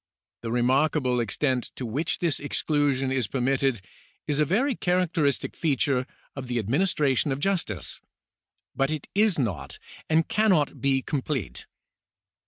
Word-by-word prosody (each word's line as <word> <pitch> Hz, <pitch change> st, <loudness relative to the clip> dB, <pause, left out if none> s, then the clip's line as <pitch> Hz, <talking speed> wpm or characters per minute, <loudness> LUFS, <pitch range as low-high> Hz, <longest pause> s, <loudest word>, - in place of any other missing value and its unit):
The 115 Hz, -, -4 dB
remarkable 130 Hz, +1 st, +2 dB
extent 125 Hz, +3 st, 0 dB
to 130 Hz, -, -5 dB
which 140 Hz, +8 st, -1 dB
this 170 Hz, -5 st, 0 dB
exclusion 145 Hz, -2 st, 0 dB
is 130 Hz, -5 st, 0 dB
permitted 135 Hz, -2 st, 0 dB, 0.4 s
is 150 Hz, -1 st, -1 dB
a 150 Hz, -, +4 dB
very 245 Hz, -, +2 dB
charac 180 Hz, -2 st, +1 dB
teristic 145 Hz, -6 st, 0 dB
feature 135 Hz, -4 st, +1 dB, 0.3 s
of 135 Hz, -2 st, -6 dB
the 120 Hz, 0 st, -2 dB
administration 140 Hz, -, +1 dB
of 135 Hz, -, -2 dB
justice; 165 Hz, -, -1 dB, 0.7 s
but 135 Hz, 0 st, +1 dB
it 155 Hz, -2 st, -3 dB
is 210 Hz, -1 st, +3 dB
not 90 Hz, -, -2 dB, 0.3 s
and 160 Hz, 0 st, +3 dB
cannot 190 Hz, -9 st, +2 dB
be 135 Hz, -1 st, +2 dB
complete. 140 Hz, -, -3 dB
140 Hz, 135 wpm, -26 LUFS, 125-155 Hz, 0.7 s, a